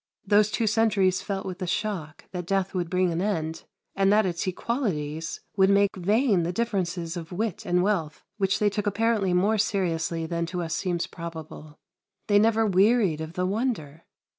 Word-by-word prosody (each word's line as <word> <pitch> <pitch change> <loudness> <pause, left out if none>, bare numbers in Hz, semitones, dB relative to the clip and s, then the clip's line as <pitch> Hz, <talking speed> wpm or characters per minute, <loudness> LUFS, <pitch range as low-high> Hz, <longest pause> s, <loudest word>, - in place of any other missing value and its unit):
Those 205 +1 +4
two 225 - 0
centuries 205 -4 +2
felt 195 -1 -4
with 185 0 -6
a 185 - -2
shock 175 -5 -3
that 180 -2 -5
death 195 0 0
would 175 -3 -2
bring 180 0 +1
an 165 +1 -1
end, 165 -6 -2 0.3
and 195 0 +3
that 215 0 +4
its 175 +1 -2
equalities 170 - -2
would 190 -1 +4
make 200 0 +3
vain 205 +2 +2
the 170 +1 -1
differences 180 -6 -2
of 170 -1 -7
wit 210 +1 -3
and 180 0 +2
wealth 185 -7 -1
which 195 -2 +1
they 210 -1 +2
took 210 0 -2
apparently 210 -2 +1
more 200 +5 +2
seriously 170 -5 0
than 170 +1 -2
to 175 0 -3
us 160 - -3
seems 175 -3 -1
probable. 160 -3 -9 0.5
They 205 -1 +4
never 225 +1 +3
wearied 195 -4 +3
of 160 +1 -6
the 180 +1 -1
wonder. 190 - -2
190 Hz, 180 wpm, -26 LUFS, 170-210 Hz, 0.5 s, Those